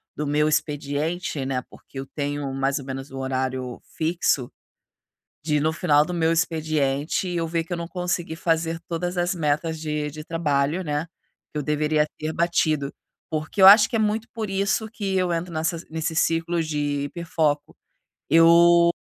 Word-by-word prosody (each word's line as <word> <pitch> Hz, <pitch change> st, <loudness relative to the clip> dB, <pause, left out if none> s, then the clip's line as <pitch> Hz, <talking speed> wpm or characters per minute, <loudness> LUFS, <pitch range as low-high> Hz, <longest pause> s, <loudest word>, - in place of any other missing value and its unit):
do 150 Hz, -, -3 dB
meu 150 Hz, +1 st, +2 dB
expediente, 150 Hz, +1 st, -2 dB
né, 130 Hz, -1 st, -1 dB
porque 135 Hz, -, -11 dB
eu 135 Hz, -, -5 dB
tenho 145 Hz, -1 st, -3 dB
mais 135 Hz, +1 st, 0 dB
ou 135 Hz, -, -9 dB
menos 135 Hz, 0 st, -6 dB
o 135 Hz, -, -6 dB
horário 130 Hz, -1 st, -3 dB
fixo, 160 Hz, -6 st, -1 dB, 0.9 s
de 150 Hz, -1 st, +1 dB
no 155 Hz, +2 st, +1 dB
final 150 Hz, -3 st, +3 dB
do 180 Hz, -, -5 dB
meu 165 Hz, -1 st, +2 dB
expediente 155 Hz, -1 st, 0 dB
eu 170 Hz, -2 st, -1 dB
ver 165 Hz, 0 st, -1 dB
que 175 Hz, -, -6 dB
eu -, -, -2 dB
não 170 Hz, 0 st, -5 dB
consegui 180 Hz, -2 st, -3 dB
fazer 165 Hz, -1 st, 0 dB
todas 175 Hz, +1 st, -3 dB
as 175 Hz, +1 st, +1 dB
metas 160 Hz, 0 st, -1 dB
de 150 Hz, -1 st, -2 dB
de 155 Hz, +1 st, -8 dB
trabalho, 155 Hz, +1 st, 0 dB
né? 150 Hz, 0 st, -2 dB, 0.4 s
Que -, -, -5 dB
eu 150 Hz, -, -2 dB
deveria 150 Hz, +1 st, +1 dB
ter 155 Hz, +1 st, -2 dB
batido. 155 Hz, -4 st, +1 dB, 0.4 s
Porque 155 Hz, +5 st, -2 dB
eu -, -, +9 dB
acho 210 Hz, +2 st, +9 dB
que -, -, -3 dB
é 225 Hz, -, +2 dB
muito 215 Hz, +2 st, 0 dB
por 220 Hz, -3 st, -4 dB
isso 200 Hz, +3 st, 0 dB
que 195 Hz, -4 st, -2 dB
eu 180 Hz, -2 st, +1 dB
entro 170 Hz, +1 st, -3 dB
nessas 165 Hz, +1 st, -2 dB
nesses 160 Hz, +1 st, -1 dB
ciclos 165 Hz, -1 st, 0 dB
de 145 Hz, -2 st, -1 dB
hiperfoco. 150 Hz, -1 st, -1 dB, 0.5 s
Eu 170 Hz, +1 st, +6 dB
160 Hz, 175 wpm, -24 LUFS, 145-170 Hz, 0.9 s, eu